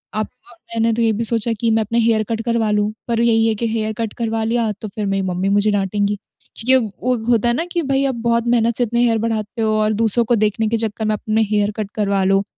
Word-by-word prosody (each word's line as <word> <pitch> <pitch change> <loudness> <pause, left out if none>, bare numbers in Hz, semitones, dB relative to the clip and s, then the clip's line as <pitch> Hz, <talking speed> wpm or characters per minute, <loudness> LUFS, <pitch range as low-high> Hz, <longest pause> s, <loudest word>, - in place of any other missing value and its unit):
आप 215 - -1 0.5
मैंने 225 0 +2
तो 235 - -1
ये 225 - +3
भी 230 +3 -2
सोचा 230 0 +1
कि 230 - +1
मैं 220 0 +3
अपने 230 +3 -1
हेयर 225 -1 +2
कट 225 0 -1
करवा 230 -2 +1
लूँ 210 0 +1 0.2
पर 230 -1 0
यही 225 -1 +3
है 220 - +1
कि 230 +2 -2
हेयर 220 -1 -1
कट 225 -2 -2
करवा 225 -1 -1
लिया 225 -1 0
तो 215 - -4
फिर 210 - -2
मेरी 195 0 0
मम्मी 185 +2 -1
मुझे 210 +1 +2
डाँटेंगी। 205 +1 0 0.4
क्योंकि 255 +4 +3
अब 230 -5 +3
वो 250 0 +2 0.2
होता 235 0 +2
है - - +2
ना 330 +5 -1
कि 345 - 0
भई 270 +1 +2
आप 265 -2 -1
बहुत 235 0 +1
मेहनत 235 -1 +2
से 245 - +2
इतने 235 +1 0
हेयर 230 -2 +3
बढ़ाते 225 +1 -2
हो 220 -1 +1
और 215 0 +1
दूसरों 230 +2 +2
को 240 +1 +2
देखने 215 +1 +1
के 230 - +1
चक्कर 220 -1 -3
में 215 - +1
अपने 220 +1 0
हेयर 205 0 +2
कट 205 -2 -4
करवा 200 -2 +1
लो 195 +1 +2
225 Hz, 260 wpm, -19 LUFS, 210-235 Hz, 0.5 s, ये